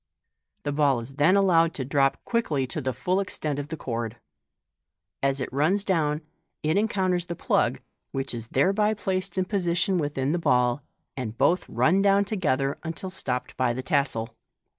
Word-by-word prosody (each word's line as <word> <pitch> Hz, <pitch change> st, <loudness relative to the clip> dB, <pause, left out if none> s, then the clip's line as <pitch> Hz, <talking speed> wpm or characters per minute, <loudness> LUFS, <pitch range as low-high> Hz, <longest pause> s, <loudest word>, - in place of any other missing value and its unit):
The 145 Hz, -, -1 dB
ball 140 Hz, -3 st, +2 dB
is 130 Hz, +4 st, -10 dB
then 160 Hz, +6 st, +5 dB
allowed 170 Hz, -4 st, +4 dB
to 130 Hz, -, -3 dB
drop 135 Hz, 0 st, +1 dB
quickly 160 Hz, -, 0 dB
to 130 Hz, +4 st, -4 dB
the 130 Hz, -1 st, -1 dB
full 180 Hz, -, 0 dB
extent 155 Hz, -7 st, -2 dB
of 145 Hz, -, -4 dB
the 160 Hz, +1 st, -5 dB
cord. 115 Hz, -3 st, -4 dB, 1.0 s
As 135 Hz, 0 st, +1 dB
it 130 Hz, -, -4 dB
runs 170 Hz, +9 st, +2 dB
down, 155 Hz, -6 st, +1 dB, 0.4 s
it 155 Hz, +2 st, +1 dB
encounters 190 Hz, -4 st, +1 dB
the 170 Hz, -, -4 dB
plug, -, -, +1 dB, 0.3 s
which 135 Hz, -1 st, -2 dB
is 115 Hz, -1 st, -6 dB
thereby 200 Hz, -, +2 dB
placed 190 Hz, -1 st, -2 dB
in 185 Hz, -, +2 dB
position 180 Hz, -1 st, +1 dB
within 145 Hz, -2 st, -1 dB
the 175 Hz, -, 0 dB
ball, 125 Hz, -3 st, +2 dB, 0.3 s
and 115 Hz, -4 st, -5 dB
both 180 Hz, +2 st, +2 dB
run 155 Hz, -, +3 dB
down 200 Hz, 0 st, +4 dB
together 145 Hz, -10 st, 0 dB
until 170 Hz, +3 st, -4 dB
stopped 125 Hz, -9 st, -3 dB
by 130 Hz, -2 st, +2 dB
the 130 Hz, +2 st, -4 dB
tassel. 130 Hz, -5 st, -1 dB
150 Hz, 170 wpm, -26 LUFS, 130-185 Hz, 1.0 s, then